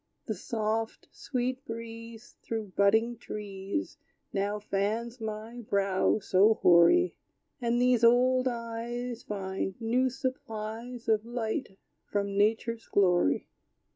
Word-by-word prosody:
The - - -2
soft, 220 -1 -3
sweet 255 0 -3
breeze 230 0 -8
Through 220 -4 -4
budding 220 +4 +3
trees 200 +4 -5 0.3
Now 200 +1 0
fans 215 +4 -2
my 220 +2 -5
brow 195 -1 +2
so 210 +1 +4
hoary: 180 - +5 0.5
And 240 0 +1
these 245 -1 +3
old 255 +2 +5
eyes 235 0 -4
Find 190 -1 -4
new 245 +3 +2
supplies 240 -2 -5
Of 215 -1 +3
light 235 -2 -3 0.3
from 200 -1 -1
nature's 225 +3 +1
glory. 180 - +3
225 Hz, 105 wpm, -29 LUFS, 205-240 Hz, 0.5 s, hoary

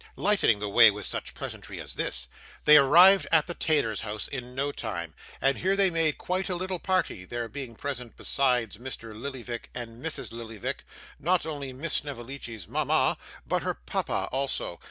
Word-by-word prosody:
Lightening 205 - +3
the 105 0 -3
way 115 +2 +8
with 105 -1 -4
such - - -4
pleasantry - - -7
as - - -6
this, - - -2 0.4
they 150 - +9
arrived 175 +8 +7
at 160 -2 +5
the 175 - -4
tailor's 145 -11 +1
house 105 -1 -4
in 125 -2 -7
no 140 +2 0
time; 85 - -5 0.3
and 135 0 +2
here 190 +2 +2
they 195 -2 +3
made 165 -2 +1
quite 185 +2 -2
a 180 - -1
little 185 0 -3
party, 185 - 0
there 120 +4 -4
being 130 -2 -7
present 125 -3 -5
besides 125 -6 +1
Mr. 120 -3 -7
Lillyvick 120 0 -6
and 120 0 -7
Mrs. 160 -1 -4
Lillyvick, 115 -2 -5 0.3
not 180 +3 +2
only 145 -4 -4
Miss 145 +5 -3
Snevellicci's 120 -7 -4
mama, - - +2 0.3
but - - 0
her - - -2
papa - - -2
also. 135 +1 -2
135 Hz, 175 wpm, -28 LUFS, 115-160 Hz, 0.4 s, they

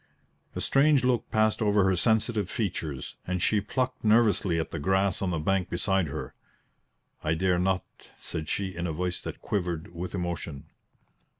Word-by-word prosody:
A - - -2
strange 140 -1 +4
look 125 -2 +1
passed 110 +1 +2
over 105 -2 +3
her 95 0 +3
sensitive 110 -1 +1
features, 80 - -3
and 90 0 -1
she 105 +4 +2
plucked 130 +5 -2
nervously 105 -6 +3
at 80 - -3
the 80 - -4
grass 95 +4 +2
on 95 - 0
the 85 - 0
bank 95 +4 0
beside 95 0 +1
her. 75 +2 -6 0.9
"I 80 +1 +1
dare 90 +1 +2
not," 95 +1 +1 0.3
said 80 -1 -5
she 95 -2 -1
in 85 +1 -2
a 80 - -2
voice 90 +2 -2
that - - -7
quivered 85 -4 -2
with 90 +3 -5
emotion. 85 -5 -4
95 Hz, 170 wpm, -28 LUFS, 85-105 Hz, 0.9 s, strange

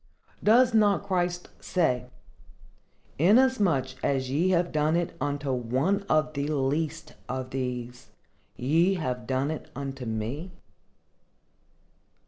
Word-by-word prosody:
Does 235 +3 +5
not 205 -3 +3
Christ 180 -2 -1
say, 125 -8 0 1.1
"Inasmuch 200 - +4
as 130 -2 0
ye 165 +7 +2
have 175 -1 +2
done 155 +1 +1
it 175 -1 -1
unto 145 -1 -1
one 130 - 0
of 155 0 +2
the 140 0 -2
least 155 +2 -1 0.2
of 130 -1 -4
these, 125 -2 -4 0.5
ye 165 +9 +2
have 125 -8 -3
done 135 +3 0
it 155 - -6
unto 135 -3 -5
me"? 120 - -4
150 Hz, 110 wpm, -27 LUFS, 130-175 Hz, 1.1 s, Does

